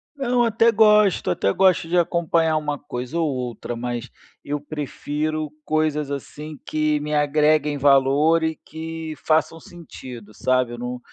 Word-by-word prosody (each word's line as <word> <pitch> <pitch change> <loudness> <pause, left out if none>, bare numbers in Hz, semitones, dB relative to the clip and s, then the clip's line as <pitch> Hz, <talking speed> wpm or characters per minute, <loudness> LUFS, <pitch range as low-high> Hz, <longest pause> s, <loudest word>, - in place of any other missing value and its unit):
Não, 250 -3 +1
até 230 0 +3
gosto, 210 - +4
até 100 +2 +1
gosto 185 -4 +3
de 175 +1 0
acompanhar 165 -2 +2
uma 150 -1 -3
coisa 130 +3 -5
ou 160 - +1
outra, 125 -2 -4
mas 120 +1 -4 0.3
eu 145 0 -3
prefiro 150 +1 -4
coisas, 155 -2 0
assim, 150 +2 -7
que 155 -1 0
me 150 0 -4
agreguem 150 0 +2
valor 140 +4 +4
e 160 0 0
que 160 0 -7
façam 160 +1 +1
sentido, 125 -11 -11
sabe, 130 -1 +1
eu - - -7
não 125 0 -5
150 Hz, 145 wpm, -22 LUFS, 135-165 Hz, 0.3 s, gosto